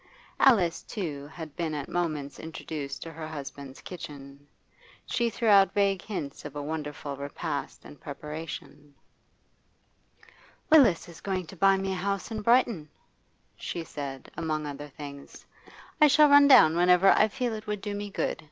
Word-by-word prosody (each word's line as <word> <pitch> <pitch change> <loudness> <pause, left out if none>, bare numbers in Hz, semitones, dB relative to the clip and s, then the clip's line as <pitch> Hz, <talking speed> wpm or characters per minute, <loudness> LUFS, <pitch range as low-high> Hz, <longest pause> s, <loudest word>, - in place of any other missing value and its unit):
Alice, 195 -11 +4
too, 150 -9 -5
had 160 -1 -9
been 165 -3 -2
at 145 -2 -4
moments 155 -5 -3
introduced 150 -3 -6
to 165 - -8
her 160 0 -7
husband's 140 -3 -8
kitchen; 145 -5 -10 0.6
she 235 -1 0
threw 230 0 -3
out 200 -2 +6
vague 200 -2 +2
hints 155 -10 -6
of 145 - -8
a 145 - -4
wonderful 150 -2 -5
repast 140 - -5
in 75 +1 -11
preparation. 150 - -8 1.8
'Willis 260 - +6
is 170 -1 -13
going 190 -2 -2
to 190 - -12
buy 195 +2 +4
me 195 0 -2
a - - -1
house 200 +3 -3
in 215 -1 -3
Brighton,' 230 -9 +2 0.7
she 170 - -5
said, 140 -4 -7
among 155 -2 -2
other 145 0 -6
things. 140 0 -11 0.6
'I 300 - +9
shall 300 +1 +6
run 285 0 +8
down 160 - +7
whenever 180 +2 +5
I 215 - +5
feel 245 0 -3
it 215 0 -7
would 210 -1 -3
do 205 0 -4
me 205 0 -5
good. - - -2
165 Hz, 160 wpm, -28 LUFS, 145-200 Hz, 1.8 s, I